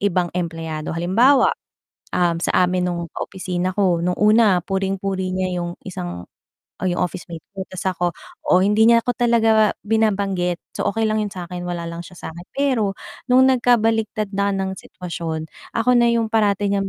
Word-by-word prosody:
ibang 180 -3 +1
empleyado, 165 -3 -4
halimbawa, 230 +11 +4 0.7
um, 175 -2 +2
sa - - 0 0.2
amin 180 0 0
nung 170 -1 -3
ka-opisina 185 -1 -3
ko 185 -4 +2
nung 180 0 0
una 210 -3 +5
puring-puri 195 -1 -2
niya 185 -1 -1
yung 175 0 -5
isang 90 - -6 0.5
oh, - - -1
'yung 175 - -1
officemate 175 -2 -4
ko 190 - -4
ta's 185 - -7
ako 180 -1 0 0.4
o - - +6
hindi 210 +3 +4
niya 235 0 +5
ako 245 - +1
talaga 225 -3 +3
binabanggit. 200 -5 +1 0.2
So, - - -1
okey 225 +2 0
lang 215 0 +1
'yun 210 - -1
sakin 180 -1 -6
wala 175 -1 -3
lang 170 0 -6
siya 180 - -13
sakin 170 +2 -11
pero 245 -8 +1 0.3
nung 260 +1 +6
nagkabaligtad 225 -4 +1
na 200 0 +2
ng 190 -1 -2
sitwasyon 165 -4 -5 0.3
ako 245 +2 +3
na 240 0 +5
yung 230 -1 +1
parati 205 -2 +2
niyang 195 -1 0
190 Hz, 165 wpm, -21 LUFS, 175-220 Hz, 0.7 s, o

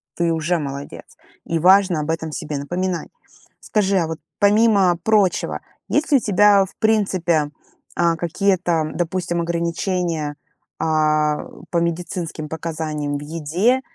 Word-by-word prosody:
Ты 170 -1 +1
уже 165 +2 0
молодец. 140 -1 -6 0.4
И 165 -1 -1
важно 185 -2 +5
об 150 - -5
этом 160 -1 -3
себе 150 -2 -4
напоминать. 175 +5 -3 0.5
Скажи, 200 -2 +1
а 165 -3 +1
вот 160 -1 -4 0.2
помимо 205 -4 +4
прочего, 210 -4 +2 0.3
есть 300 +1 0
ли 280 - +7
у - - -1
тебя, 205 -1 +4
в - - -16
принципе, 185 -8 +1 0.4
а, 170 -1 +2
какие-то, 170 -3 0
допустим, 175 0 -1
ограничения, 170 -2 -2 0.4
а, 155 -1 +1 0.3
по 170 - +1
медицинским 170 -2 -3
показаниям 155 -3 -3
в - - -8
еде 165 - 0
170 Hz, 130 wpm, -21 LUFS, 155-190 Hz, 0.5 s, ли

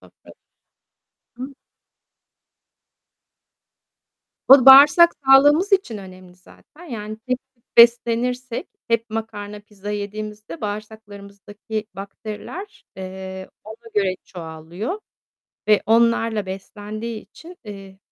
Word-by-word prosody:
Sofrada. - - -19 1.0
Hı. 265 +3 -8 2.9
Bu 270 -1 +8
bağırsak 290 +6 +9
sağlığımız 290 +9 +5
için 310 - +1
önemli 185 -2 -13
zaten. 295 - -19
Yani 215 -7 -7
tek 255 0 -1 0.2
tip 235 - -41
beslenirsek 235 +1 +3 0.2
hep 230 -1 0
makarna, 210 -2 -6
pizza 205 -1 -10
yediğimizde 210 -2 -6
bağırsaklarımızdaki 205 0 -7
bakteriler, 215 - -9
eee, 190 0 -8 0.2
ona 225 +2 -12
göre 195 -3 +1
çoğalıyor 170 - -7 0.7
ve 210 - +4
onlarla 225 -2 +2
beslendiği 210 +4 -7
için, 350 +2 -15
eee, 195 -2 -11
215 Hz, 90 wpm, -21 LUFS, 200-235 Hz, 2.9 s, bağırsak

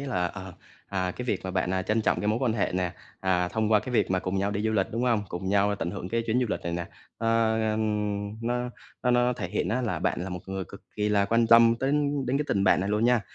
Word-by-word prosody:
là, 125 -11 -1
ờ, 95 0 -8 0.4
à, 95 -2 -1
cái 125 - -6
việc 105 -6 -1
mà 95 - -3
bạn 90 -1 0 0.2
trân 110 +1 +2
trọng - - +1
cái 105 - -2
mối 110 +2 +1
quan 120 -4 +2
hệ 110 - 0
nè, 90 -1 -1 0.3
à, 90 -2 +1
thông 110 +1 0
qua 105 - +5
cái 130 - -7
việc 115 - +2
mà 95 - +2
cùng 95 +1 -2
nhau 100 +1 0
đi 105 +1 -2
du 110 - +1
lịch, 95 -3 +2
đúng 115 +2 -2
hông? 115 -4 +2
Cùng 90 +2 -4
nhau 100 +1 +3
tận 85 -2 -3
hưởng 90 - -6
cái 115 0 0
chuyến 120 +3 +2
du 125 - +1
lịch - - -2
này 85 - -3
nè, 85 0 -3 0.3
à, 115 0 +2 0.2
ừm, 105 -1 -2
nó 120 0 -1 0.3
nó 125 - +2
nó 125 0 +3
thể - - -5
hiện - - -1
á 125 +4 0
là 115 - -1
bạn - - -1
là 95 - -4
một 90 -1 -5
người 95 0 -4
cực - - -13
kỳ 105 0 +1
là 100 -1 +3
quan 115 +2 +2
tâm 115 0 +7
tới 135 +1 +1 0.4
đến 135 +3 +1
cái 150 - -1
tình 100 0 +1
bạn 95 -2 +4
này 95 - -2
luôn 105 +2 +1
nha. 120 -2 +4
105 Hz, 285 wpm, -27 LUFS, 95-115 Hz, 0.4 s, tâm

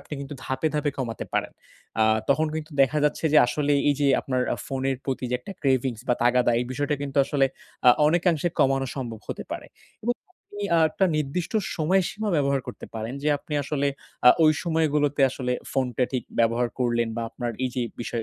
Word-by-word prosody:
আপনি - - -16
কিন্তু 140 +1 -6
ধাপে, 130 +4 0
ধাপে 150 -1 +1
কমাতে 115 -4 -3
পারেন। - - -1 0.5
আ - - +5 0.2
তখন 155 +3 +3
কিন্তু 155 +1 -5
দেখা 135 +3 +2
যাচ্ছে 150 +2 0
যে, 155 - +8
আসলে 145 +4 0 0.2
এইযে 145 0 +1
আপনার 130 -1 -1
আ - - -7
ফোনের 135 0 -1
প্রতি 130 -1 -2
যে - - 0
একটা 195 - -8
ক্রেভিংস 130 -4 +1
বা 125 - +4
তাগাদা 125 0 +4
এই - - -1
বিষয়টা 145 +3 -1
কিন্তু 140 0 -5
আসলে 140 -1 +2 0.4
আ - - +11 0.2
অনেকাংশে 175 0 +2
কমানো 135 0 +3
সম্ভব 115 -5 -5
হতে - - -5
পারে। - - -5 0.4
এবং 240 - +1 0.4
আপনি 205 - -4
আ - - +5
একটা 190 - +1
নির্দিষ্ট 155 +4 -2 0.2
সময়সীমা 190 +6 +1
ব্যবহার 140 -1 +2
করতে - - -8
পারেন। 110 +3 -4
যে 150 - +1
আপনি 150 - -11
আসলে 140 0 -1 0.4
আ 125 - +12
ওই 155 - +6
সময়গুলোতে 150 -4 +1
আসলে 125 -1 -2 0.2
ফোনটা 125 -2 +1
ঠিক 130 - -1
ব্যবহার 115 +1 +2
করলেন। 120 -2 +1
বা 115 - -2
আপনার 120 -1 -4
এইযে 125 -1 -2 0.2
বিষয় 115 -1 -3
135 Hz, 190 wpm, -25 LUFS, 125-150 Hz, 0.5 s, আ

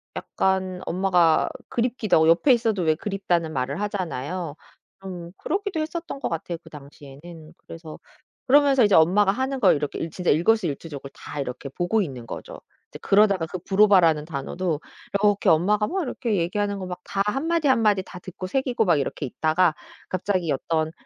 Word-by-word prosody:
약간 190 -1 -1
엄마가 175 -3 +2 0.2
그립기도 235 -3 0
하고 160 0 +4
옆에 180 - +5
있어도 225 -6 0
왜 160 -1 +2
그립다는 175 -3 -1
말을 135 +6 -2
하잖아요. 180 -5 -4 0.5
좀 175 -3 -8
그러기도 395 -4 -2
했었던 320 -2 -5
것 - - -1
같아요 165 +1 -4
그 160 - -14
당시에는. 150 +3 -13
그래서 165 -1 -10 0.5
그러면서 275 -1 +5
이제 205 - +4
엄마가 190 +5 +5
하는 265 +3 -2
걸 - - +5
이렇게 145 -1 -3
일 165 - -3
진짜 180 +2 -3
일거수일투족을 160 -5 0
다 150 - -8
이렇게 130 +1 -6
보고 175 +10 0
있는 130 -10 -5
거죠. - - -8 0.3
이제 - - -11
그러다가 200 -4 +3
그 185 - -5
브로바라는 190 -5 +4
단어도 160 +2 -3 0.4
이렇게 205 -1 +3
엄마가 205 +6 +3
막 375 +1 -2
이렇게 240 -5 -2
얘기하는 200 +4 -1
거 185 - -5
막 180 0 -6
다 195 - -2
1 270 +9 -1
마디, 335 -3 +1
1 260 -3 +3
마디 210 -3 +3
다 185 -1 -11
듣고 185 +1 -8
새기고 245 +1 0
막 170 -5 +3
이렇게 140 +1 -3
있다가 160 +5 +1 0.3
갑자기 185 -3 -1
어떤 155 +3 -1
185 Hz, 390 characters per minute, -24 LUFS, 160-210 Hz, 0.5 s, 옆에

